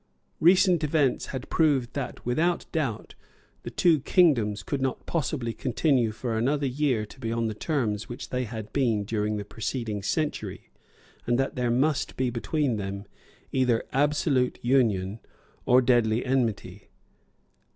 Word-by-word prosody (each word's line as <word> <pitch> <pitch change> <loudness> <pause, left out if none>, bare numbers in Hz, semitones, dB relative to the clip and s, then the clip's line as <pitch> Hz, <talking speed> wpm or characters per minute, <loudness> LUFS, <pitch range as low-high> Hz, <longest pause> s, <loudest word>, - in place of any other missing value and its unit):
Recent 180 0 +5
events 145 -3 +1
had 130 -1 -6
proved 140 -7 +2
that, 140 -3 -5
without 165 +8 +1
doubt, 135 -10 -2 0.5
the - - -6
two 165 -4 +3
kingdoms 125 - +2
could 140 +6 -3
not 130 -1 -2
possibly 130 -7 -2
continue 125 -2 +1
for 115 +1 -4
another 140 +6 +1
year 130 -4 0
to 120 - -16
be 115 -3 -3
on 115 0 0
the 110 - -1
terms 105 -5 -1
on - - -22
which 120 - -7
they 125 0 -1
had 110 -2 -7
been 115 -7 +1
during 105 0 -1
the 100 - -5
preceding 110 0 -4
century, 150 +9 -3 0.6
and 120 0 +2
that 135 +1 -1
there 125 -2 0
must 135 +4 0
be 125 -1 0
between 125 +1 -1
them 100 0 -5 0.5
either 125 -3 +2
absolute 140 -2 +1
union 110 -6 +1 0.5
or 125 +1 +5
deadly 120 -2 +2
enmity. 110 -7 -2
125 Hz, 150 wpm, -26 LUFS, 110-140 Hz, 0.6 s, Recent